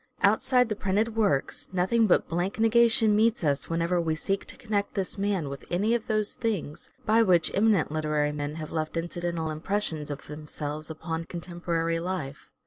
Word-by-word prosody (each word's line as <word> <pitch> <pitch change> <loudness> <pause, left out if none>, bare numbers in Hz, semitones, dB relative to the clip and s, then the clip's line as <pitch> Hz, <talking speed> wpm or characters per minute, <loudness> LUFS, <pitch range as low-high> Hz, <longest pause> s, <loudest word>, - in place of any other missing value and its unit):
Outside 250 -2 +4
the 215 - -2
printed 210 +3 0
works 200 -12 0
nothing 190 +5 +2
but 180 - +3
blank 175 +5 -2
negation 225 -1 +4
meets 220 -1 +2
us 140 -2 0
whenever 170 +1 +1
we 160 -1 0
seek 195 +5 -2
to - - -10
connect 205 -3 -2
this 195 0 -2
man 195 -6 0
with 140 0 -7
any 205 +6 +1
of 235 -2 -1
those 215 -2 +1
things 205 -10 -3 0.2
by 220 +2 +4
which 180 -6 +3
eminent 210 -5 +3
literary 150 -1 0
men 145 0 -4
have 155 -1 -6
left 155 0 -2
incidental 170 -1 -2
impressions 160 -2 -2
of 145 - -6
themselves 150 0 -6
upon 160 +1 -4
contemporary 170 -1 -2
life. 170 -6 -5
175 Hz, 170 wpm, -27 LUFS, 155-210 Hz, 0.2 s, Outside